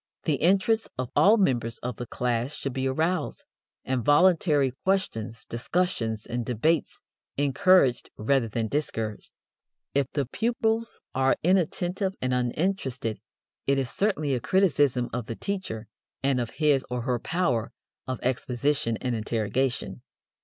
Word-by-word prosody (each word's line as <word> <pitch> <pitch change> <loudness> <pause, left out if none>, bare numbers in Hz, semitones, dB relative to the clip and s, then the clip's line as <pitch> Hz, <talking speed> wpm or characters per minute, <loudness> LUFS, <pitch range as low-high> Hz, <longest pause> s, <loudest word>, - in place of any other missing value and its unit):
The 150 -4 +1
interest 200 +7 +2
of 130 -1 -3
all 210 +4 +6
members 120 - +1
of 125 -2 -3
the 120 - -5
class 125 +4 -1
should 135 - -4
be 130 +1 -1
aroused, 160 +7 -1 0.4
and 130 -2 -1
voluntary 150 - +4
questions, 115 - -1
discussions 115 -5 -1
and 120 0 -3
debates 140 +8 0 0.4
encouraged 140 -1 +3
rather 125 +2 +2
than 110 +1 -2
discouraged. 110 -5 -3 0.6
If 140 -2 +2
the 140 -2 0
pupils 225 - -1
are 130 0 +3
inattentive 185 +2 +1
and 130 0 -1
uninterested, 125 - -1 0.5
it 140 0 +3
is 135 -2 -1
certainly 155 -9 0
a 125 - +1
criticism 145 -7 +2
of 120 -2 -3
the 115 - -4
teacher 185 - -4 0.4
and 135 -2 +2
of 120 - -3
his 150 -4 +3
or 125 0 -2
her 125 -1 0
power 125 -9 0 0.4
of 130 -2 -3
exposition 130 -1 0
and 125 -1 -1
interrogation. 115 - -1
135 Hz, 135 wpm, -27 LUFS, 120-175 Hz, 0.6 s, all